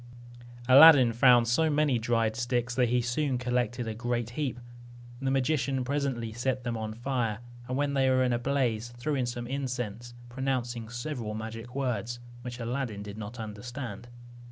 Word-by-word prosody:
Aladdin 135 -3 +9
found 120 0 +5
so 160 +7 +3
many 145 -4 +2
dried 115 -1 +1
sticks, 120 0 -1
that 125 -1 +2
he 125 +1 +2
soon 125 +2 0
collected 125 -1 -1
a 110 - -2
great 120 0 -2
heap. 125 -2 -3 0.6
The 135 - 0
magician 135 0 +1
presently 130 -4 -2
set 125 +2 -1
them 120 -2 -2
on 110 -1 -4
fire; 120 -3 -1 0.3
and 130 0 -2
when 145 0 0
they 135 -1 +3
were 130 0 +3
in 125 -1 +1
a 120 - 0
blaze, 120 -3 0
threw 150 +5 -2
in 130 -3 0
some 120 0 -4
incense, 120 -3 -4
pronouncing 120 -3 -3
several 120 -3 -4
magical 115 +3 -7
words, 120 -2 -2 0.2
which 120 0 -7
Aladdin 115 -3 -3
did 105 +1 -8
not 110 +3 -7
understand. 115 +1 -7
120 Hz, 165 wpm, -29 LUFS, 115-130 Hz, 0.6 s, Aladdin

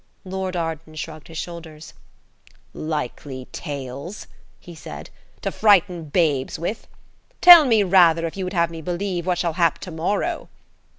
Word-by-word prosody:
Lord 190 0 -4
Arden 165 -2 -4
shrugged 155 -2 -7
his 165 - -10
shoulders. 160 -3 -8 0.8
"Likely 140 -3 -5
tales," 140 +4 -7 0.3
he 175 - -12
said, 160 - -10 0.3
"to - - -2
frighten 185 -5 +3
babes 150 -4 0
with. 175 +7 -4 0.5
Tell 345 -3 +10
me 225 -5 +4
rather, 175 -3 +4
if 165 - -5
you 195 - -4
would 185 +1 -4
have 170 -2 +1
me 165 -1 -7
believe, 180 +1 -3
what 180 -1 +1
shall 170 -2 -1
hap 170 -1 +2
to 185 - -9
morrow." 200 - -2
170 Hz, 145 wpm, -22 LUFS, 155-185 Hz, 0.8 s, Tell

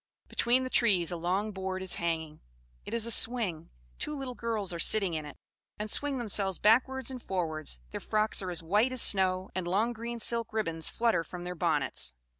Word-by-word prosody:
"Between 250 +2 +1
the 255 - -5
trees 190 -8 +3
a - - -3
long 185 +5 -1
board 190 -1 -4
is 190 - -2
hanging 160 -2 -3 0.4
it - - -7
is 230 -1 0
a 235 - 0
swing. 210 -11 +2 0.3
Two 300 -1 -3
little 265 -2 -5
girls 220 -6 -3
are 170 - -5
sitting 195 0 +4
in 155 -2 -4
it, 145 - -11 0.4
and 210 0 -4
swing 290 -2 0
themselves 200 -6 +1
backwards 260 +4 +2
and 255 -2 -7
forwards; 155 - -3
their - - -5
frocks 215 0 0
are 185 - -4
as 170 -2 -5
white 210 +9 +2
as 255 -2 +2
snow, 185 -1 +4
and 185 -2 -3
long 215 +7 +1
green 235 +1 -6
silk 230 0 +1
ribands 165 -7 -2
flutter 230 -7 +1
from 175 +2 -9
their 180 0 -5
bonnets. 155 - 0
195 Hz, 200 wpm, -29 LUFS, 175-235 Hz, 0.4 s, sitting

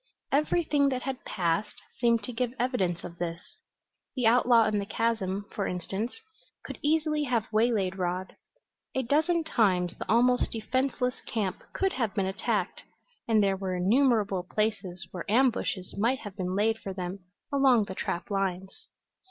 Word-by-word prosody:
Everything 295 -1 +2
that 255 -2 -2
had 265 -1 -4
passed 180 +3 -1 0.2
seemed 235 -2 +3
to 250 - -4
give 245 +1 -2
evidence 195 -9 0
of 170 -1 -9
this. 170 -1 -3 0.8
The 250 -3 0
outlaw 235 0 +5
in 215 -1 +1
the 200 - -3
chasm, 205 -3 -1
for 200 - -2
instance, 195 +6 -3 0.5
could - - -7
easily 305 0 +1
have 235 -4 0
waylaid 215 -4 +2
Rod; 180 +1 -2 0.6
a 260 - +1
dozen 315 +6 +2
times 185 - +2
the - - -6
almost 245 +2 +4
defenseless 250 +2 -1
camp 200 -5 -2
could 385 0 0
have 230 -6 -1
been 195 -3 +1
attacked, 190 +1 -1 0.5
and 220 -2 +4
there 195 -1 +2
were 190 -1 -3
innumerable 205 0 +3
places 195 -1 -2
where 180 0 -6
ambushes 220 -6 +1
might 235 +6 +1
have 205 -3 -8
been 185 -2 -2
laid 220 +2 +2
for 195 - -6
them 185 +1 -5 0.3
along 265 -5 +5
the 190 - -6
trap 175 0 -4
lines. 190 -1 -3
215 Hz, 155 wpm, -28 LUFS, 190-250 Hz, 0.8 s, outlaw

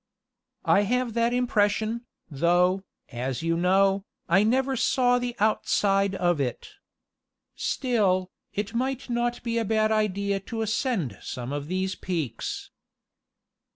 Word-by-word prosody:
"I 200 - +5
have 245 +3 0
that 235 +1 +2
impression, 230 -1 +1 0.2
though, 175 +5 +2 0.3
as 125 +3 -3
you 165 0 +1
know, 195 +3 +3 0.2
I 180 +4 +5
never 260 +5 +2
saw 245 0 +3
the 245 -1 -3
outside 200 -2 +2
of 175 -5 +1
it. 125 - -3 0.8
Still, 195 -8 0 0.2
it 205 +2 -3
might 255 +1 -2
not 240 0 -1
be 230 -1 0
a - - 0
bad 215 0 +2
idea 200 -2 +1
to 225 +3 -4
ascend 215 - -1
some 125 +1 -5
of 145 0 -4
these 185 +2 -1
peaks." 155 -11 -4
200 Hz, 125 wpm, -26 LUFS, 180-235 Hz, 0.8 s, I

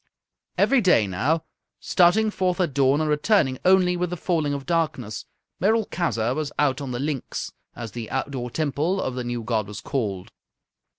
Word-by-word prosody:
Every 275 -3 +4
day 180 - +4
now, 145 - 0 0.4
starting 205 +5 +3
forth 185 -2 -1
at 170 -6 0
dawn 140 +2 +3
and 155 - 0
returning 150 - +2
only 185 -1 +4
with 180 0 -1
the 180 - -4
falling 160 -4 0
of 140 -1 -4
darkness, 155 - -2 0.4
Merolchazzar 175 - +1
was 150 0 -3
out 145 -2 +1
on 140 - -5
the 125 - -3
Linx, 140 0 -3 0.2
as 115 -3 -6
the 115 0 -6
outdoor 135 -2 -3
temple 155 +7 -1
of 130 - -2
the 125 0 -4
new 120 -1 -3
god 110 -2 -1
was 105 0 -7
called. 100 -8 -3
145 Hz, 170 wpm, -24 LUFS, 120-175 Hz, 0.4 s, Every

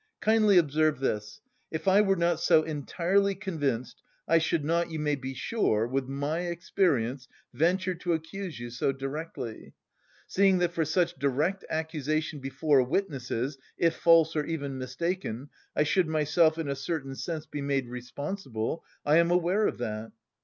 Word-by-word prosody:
Kindly 215 -3 +4
observe 155 -2 +3
this: 105 -5 -2 0.3
if 160 +3 -5
I 195 +2 +6
were 195 -2 +3
not 170 -2 +1
so 155 - +4
entirely 175 +6 0
convinced 145 - -3 0.3
I 165 +1 +5
should 160 -1 0
not, 170 +2 +1
you 160 - -4
may 150 -1 0
be 135 -1 -4
sure, 120 - +1
with 130 +1 -1
my 145 +4 -2
experience 150 - 0 0.3
venture 185 +7 +1
to 175 0 -2
accuse 165 0 -5
you 120 0 -6
so 125 +3 0
directly. 135 -3 -6 0.5
Seeing 195 -1 +3
that 175 -1 +1
for 165 -2 0
such 170 +3 0
direct 150 +8 0
accusation 155 -1 -2
before 135 +1 +2
witnesses, 135 -3 -2 0.2
if 165 -1 +3
false 165 -1 +5
or 150 - +1
even 140 -5 -3
mistaken, 130 - -3 0.3
I - - +4
should 175 +3 +2
myself 155 +1 +3
in 165 -3 -3
a 140 - -1
certain 135 -1 -3
sense 155 +2 -4
be 145 - -6
made 140 -2 0
responsible, 125 - -4 0.2
I 150 +2 +5
am 170 0 +4
aware 180 +4 +2
of - - -3
that. 110 -2 -4
155 Hz, 160 wpm, -28 LUFS, 135-170 Hz, 0.5 s, I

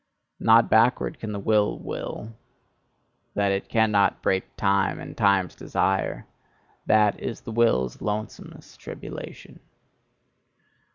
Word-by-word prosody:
Not 115 +1 +5
backward 115 +3 +2
can 110 - -5
the 100 - -4
Will 105 0 +1
will; 110 +2 -6 1.0
that 100 -1 +1
it 100 0 -2
cannot 105 -3 +2
break 95 0 -1
time 100 -1 +1
and - - -9
time's 100 -4 +2
desire - - -1 0.6
that 105 -2 +3
is 115 - -5
the - - -8
Will's 110 - +1
lonesomest 105 0 -6
tribulation. - - -9
105 Hz, 110 wpm, -25 LUFS, 100-110 Hz, 1.0 s, Not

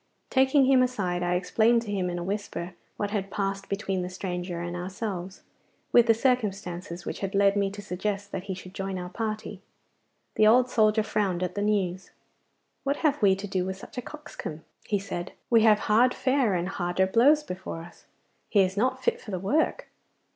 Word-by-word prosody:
Taking 265 +1 +4
him 260 -1 +5
aside 195 -9 0
I 175 0 +1
explained 220 +6 +3
to 210 - -6
him 185 -3 -1
in 175 - -3
a 175 - -3
whisper 195 -2 -4 0.2
what 205 -1 -2
had 200 -2 -2
passed 195 -1 -3
between 195 -2 -1
the 180 - -3
stranger 180 -1 -4
and 175 0 -4
ourselves, 185 0 -5 0.5
with 240 -1 +6
the 225 - +6
circumstances 195 -8 -1
which - - -4
had 195 0 -3
led 200 0 +4
me 200 -1 +1
to 205 +1 -9
suggest 200 +1 -3
that 180 - -5
he 190 -2 -3
should 185 0 -11
join 195 -1 -3
our 180 0 -5
party. 215 -3 -4 0.8
The 215 - +6
old 250 +3 +5
soldier 215 -1 +3
frowned 195 -4 0
at 180 0 -2
the 205 - -3
news. 190 -3 0 0.7
'What 280 +1 0
have 295 -3 +2
we 195 -2 +5
to 195 +2 -6
do 190 -2 -1
with 190 +1 -4
such - - -12
a 250 - -3
coxcomb?' 245 - -8 0.2
he 205 - +1
said. 190 -2 -5 0.2
'We 230 -1 +6
have 210 -1 +6
hard 240 +4 +3
fare 260 -7 +2
and 175 0 -1
harder 180 0 0
blows 265 +10 +4
before 180 - -6
us. 175 - -15 0.4
He 205 - +4
is 190 0 +1
not 255 +4 0
fit - - +1
for 225 - -11
the 190 - -2
work. 280 - 0
200 Hz, 200 wpm, -27 LUFS, 185-225 Hz, 0.8 s, with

